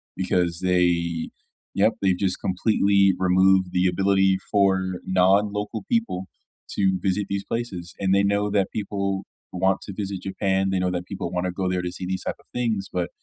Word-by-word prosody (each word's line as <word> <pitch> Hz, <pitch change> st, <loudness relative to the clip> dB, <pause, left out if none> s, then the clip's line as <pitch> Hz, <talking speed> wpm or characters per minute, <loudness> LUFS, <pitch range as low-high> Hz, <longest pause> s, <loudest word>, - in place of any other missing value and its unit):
because 90 Hz, -2 st, 0 dB
they 85 Hz, -2 st, +1 dB, 0.5 s
Yep, 105 Hz, +3 st, +3 dB
they've 95 Hz, -2 st, +2 dB
just 95 Hz, -2 st, -1 dB
completely 100 Hz, 0 st, +3 dB
removed 95 Hz, +1 st, +4 dB
the 90 Hz, 0 st, +1 dB
ability 95 Hz, +1 st, +2 dB
for 95 Hz, -2 st, +2 dB
non-local 105 Hz, +3 st, +1 dB
people 225 Hz, -, 0 dB, 0.5 s
to 95 Hz, -2 st, +1 dB
visit 95 Hz, +2 st, -1 dB
these 100 Hz, 0 st, -2 dB
places, 95 Hz, -7 st, -4 dB
and 95 Hz, -1 st, +2 dB
they 100 Hz, -, +3 dB
know 100 Hz, +1 st, +1 dB
that 100 Hz, -2 st, +1 dB
people 100 Hz, -2 st, -2 dB, 0.3 s
want 95 Hz, +1 st, +1 dB
to 100 Hz, -, -7 dB
visit 100 Hz, -2 st, -4 dB
Japan, 95 Hz, 0 st, 0 dB
they 95 Hz, -, +1 dB
know 90 Hz, 0 st, +1 dB
that 90 Hz, 0 st, -3 dB
people 90 Hz, -3 st, -5 dB
wanna 90 Hz, 0 st, -1 dB
go 95 Hz, +1 st, -2 dB
there 90 Hz, -1 st, -1 dB
to 90 Hz, -, -3 dB
see 90 Hz, 0 st, -6 dB
these 95 Hz, 0 st, -3 dB
type -, -, -3 dB
of -, -, -25 dB
things, 115 Hz, -5 st, -1 dB
but 90 Hz, -2 st, -2 dB
95 Hz, 175 wpm, -24 LUFS, 90-100 Hz, 0.5 s, removed